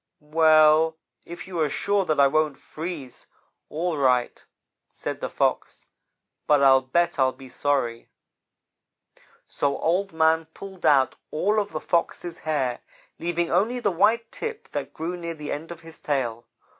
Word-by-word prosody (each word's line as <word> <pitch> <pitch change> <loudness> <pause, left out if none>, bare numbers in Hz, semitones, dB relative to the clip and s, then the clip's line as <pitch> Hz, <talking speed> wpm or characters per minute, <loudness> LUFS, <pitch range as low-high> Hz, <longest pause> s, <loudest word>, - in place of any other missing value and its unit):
"'Well 155 +1 +4 0.3
if 170 0 -8
you 180 -3 -5
are 155 -2 +2
sure 200 +5 0
that 155 -4 0
I 140 - +7
won't 155 0 +1
freeze, 155 -6 -8 0.4
all 165 +1 -2
right,' 125 -3 +1 0.5
said - - -5
the - - -3
Fox, - - -1 0.6
'but 145 -2 +4
I'll 135 -1 +6
bet 170 +5 0
I'll 130 0 +4
be 135 -1 -13
sorry.' 125 -5 -1 1.4
"So 140 -1 -1
Old 185 +4 0
man 160 0 +2
pulled 190 -2 -5
out 135 -3 +4
all 205 +7 +1
of 205 -1 -3
the 155 - -3
Fox's 170 0 -2
hair, 135 -6 -1 0.4
leaving 170 0 -1
only 220 +8 +1
the 205 -4 +1
white 220 +6 +2
tip 455 -1 -6
that - - -4
grew 170 +3 -4
near 170 -1 -6
the 150 -1 -6
end 160 +3 -5
of 170 -1 -9
his 165 0 -13
tail. 120 -5 -2
160 Hz, 155 wpm, -25 LUFS, 145-175 Hz, 1.4 s, I